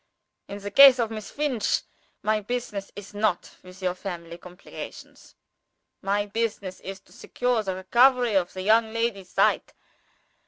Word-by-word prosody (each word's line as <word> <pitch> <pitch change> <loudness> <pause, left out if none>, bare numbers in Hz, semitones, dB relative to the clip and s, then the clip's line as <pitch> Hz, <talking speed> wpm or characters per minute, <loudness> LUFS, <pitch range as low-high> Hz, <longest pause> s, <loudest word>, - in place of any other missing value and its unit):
In 200 - -7
the 205 0 -7
case 275 +3 +9
of 230 -2 -1
Miss 215 -2 -6
Finch, 285 -7 0 0.4
my 215 0 +2
business 210 -3 -4
is 205 0 -10
not 205 -3 -1
with 185 +1 -14
your 180 -1 +1
family 175 -3 -7
complications. 180 +1 -11 0.7
My 200 +1 0
business 205 -3 -3
is 195 0 -8
to - - -26
secure 245 -2 -1
the 190 -3 -3
recovery 245 +5 +3
of 185 -3 +1
the 185 - -5
young 220 +2 +3
lady's 230 -5 -2
sight. - - +1
205 Hz, 150 wpm, -25 LUFS, 190-230 Hz, 0.7 s, case